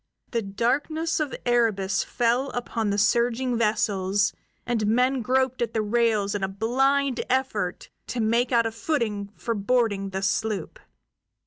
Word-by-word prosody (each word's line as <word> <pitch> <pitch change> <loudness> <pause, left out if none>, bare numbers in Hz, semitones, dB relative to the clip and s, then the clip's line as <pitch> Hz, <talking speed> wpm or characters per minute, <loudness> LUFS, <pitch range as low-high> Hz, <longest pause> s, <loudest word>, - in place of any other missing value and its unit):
The 235 - 0
darkness 275 +12 -1
of 305 -3 -2
Erebus 215 -6 +2
fell 245 +3 0
upon 230 -3 -2
the 200 - 0
surging 240 +4 +2
vessels, 205 -3 +1 0.3
and 225 -4 0
men 250 +4 +2
groped 260 +2 +1
at 230 -1 -2
the 220 - +1
rails 215 -2 +1
in 205 -1 -2
a - - +2
blind 260 +6 +1
effort 220 -8 -1 0.2
to 250 - -4
make 235 +3 +1
out 235 -2 +3
a 225 - -1
footing 220 -5 -2
for 230 - -2
boarding 205 -2 0
the 190 0 -4
sloop. 205 -2 -1
230 Hz, 145 wpm, -25 LUFS, 205-250 Hz, 0.3 s, out